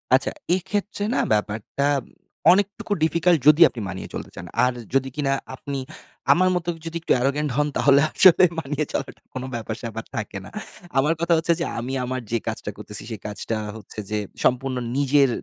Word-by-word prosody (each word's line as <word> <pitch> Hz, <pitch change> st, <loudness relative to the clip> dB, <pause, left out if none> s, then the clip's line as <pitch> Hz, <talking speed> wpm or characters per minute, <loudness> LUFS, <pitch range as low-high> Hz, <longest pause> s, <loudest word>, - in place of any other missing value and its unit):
আচ্ছা। -, -, +1 dB, 0.2 s
এক্ষেত্রে 200 Hz, +2 st, -3 dB
না -, -, +2 dB
ব্যাপারটা, 105 Hz, +6 st, -1 dB, 0.7 s
অনেকটুকু 200 Hz, +2 st, +1 dB
ডিফিকাল্ট 170 Hz, +1 st, +3 dB
যদি 150 Hz, +2 st, +7 dB
আপনি 115 Hz, -, -7 dB
মানিয়ে 95 Hz, -1 st, -6 dB
চলতে -, -, -6 dB
চান। -, -, -7 dB, 0.2 s
আর 125 Hz, -, +1 dB, 0.2 s
যদি 135 Hz, 0 st, +2 dB
কিনা 145 Hz, -2 st, 0 dB, 0.2 s
আপনি, 140 Hz, +1 st, -5 dB, 0.6 s
আমার 185 Hz, +1 st, +3 dB
মতো 175 Hz, -1 st, -2 dB, 0.2 s
যদি 165 Hz, 0 st, -3 dB
একটু -, -, +2 dB
অ্যারোগেন্ট 140 Hz, +4 st, 0 dB
হন, 150 Hz, 0 st, +3 dB
তাহলে 140 Hz, 0 st, +5 dB
আসলে 185 Hz, -1 st, +7 dB, 0.2 s
মানিয়ে 150 Hz, 0 st, -2 dB
চলাটা -, -, -4 dB
কোনো 130 Hz, 0 st, -4 dB
ব্যাপার-স্যাপার 115 Hz, 0 st, -5 dB
থাকে 105 Hz, -3 st, -4 dB
না। -, -, -9 dB, 0.5 s
আমার 145 Hz, +4 st, +4 dB
কথা 170 Hz, 0 st, +2 dB
হচ্ছে 170 Hz, +1 st, +2 dB
যে, -, -, 0 dB
আমি 125 Hz, +3 st, -4 dB
আমার 130 Hz, 0 st, -3 dB
যে, 120 Hz, -, +2 dB
কাজটা -, -, -3 dB
করতেছি, -, -, -2 dB
সে 110 Hz, -, -4 dB
কাজটা 105 Hz, +2 st, -3 dB, 0.2 s
হচ্ছে 105 Hz, 0 st, -10 dB
যে, 105 Hz, -, +1 dB, 0.3 s
সম্পূর্ণ 130 Hz, +1 st, +1 dB, 0.2 s
নিজের 140 Hz, -1 st, +4 dB
140 Hz, 170 wpm, -23 LUFS, 120-170 Hz, 0.7 s, যদি